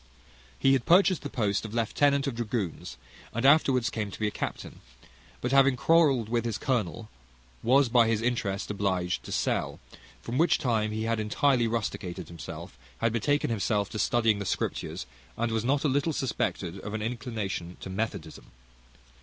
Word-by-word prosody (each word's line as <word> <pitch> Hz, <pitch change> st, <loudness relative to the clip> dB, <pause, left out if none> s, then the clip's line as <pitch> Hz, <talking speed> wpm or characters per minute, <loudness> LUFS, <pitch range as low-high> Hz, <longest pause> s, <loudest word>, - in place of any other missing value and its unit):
He 135 Hz, -, +4 dB
had 130 Hz, -3 st, 0 dB
purchased 185 Hz, 0 st, +5 dB
the 145 Hz, -, -5 dB
post 105 Hz, -6 st, 0 dB
of 110 Hz, 0 st, -7 dB
lieutenant 140 Hz, +5 st, +2 dB
of 140 Hz, -, -2 dB
dragoons, 105 Hz, -, -4 dB, 0.4 s
and 115 Hz, +3 st, 0 dB
afterwards 135 Hz, -4 st, +4 dB
came 105 Hz, -2 st, -3 dB
to -, -, -9 dB
be 110 Hz, -, 0 dB
a -, -, -2 dB
captain; -, -, -6 dB, 0.6 s
but 125 Hz, -, -1 dB
having 135 Hz, -1 st, +5 dB
quarrelled 140 Hz, -5 st, +3 dB
with 115 Hz, 0 st, 0 dB
his 115 Hz, -2 st, -2 dB
colonel, 115 Hz, -4 st, -2 dB, 0.5 s
was 130 Hz, +3 st, +4 dB
by 120 Hz, -1 st, +4 dB
his 110 Hz, -1 st, +1 dB
interest 110 Hz, -5 st, -1 dB
obliged 95 Hz, -3 st, -1 dB
to -, -, -8 dB
sell; -, -, -1 dB, 0.4 s
from 120 Hz, +4 st, -3 dB
which 170 Hz, -, +4 dB
time 110 Hz, -4 st, 0 dB
he 110 Hz, +1 st, -2 dB
had 115 Hz, 0 st, 0 dB
entirely 120 Hz, +3 st, +2 dB
rusticated 95 Hz, -6 st, -3 dB
himself, 85 Hz, -6 st, -8 dB, 0.2 s
had 115 Hz, -1 st, 0 dB
betaken 145 Hz, +3 st, +1 dB
himself 105 Hz, -2 st, 0 dB
to 110 Hz, -, -4 dB
studying 115 Hz, -3 st, +2 dB
the 100 Hz, -, -4 dB
Scriptures, 75 Hz, -, -3 dB, 0.3 s
and 115 Hz, 0 st, 0 dB
was 110 Hz, -1 st, 0 dB
not 140 Hz, +3 st, +1 dB
a -, -, +3 dB
little 145 Hz, +4 st, +1 dB
suspected 100 Hz, -, -2 dB
of 105 Hz, +2 st, -6 dB
an 110 Hz, -, -3 dB
inclination 110 Hz, -7 st, -4 dB
to 95 Hz, -, -7 dB
methodism. 110 Hz, +3 st, -4 dB
115 Hz, 170 wpm, -28 LUFS, 105-130 Hz, 0.6 s, purchased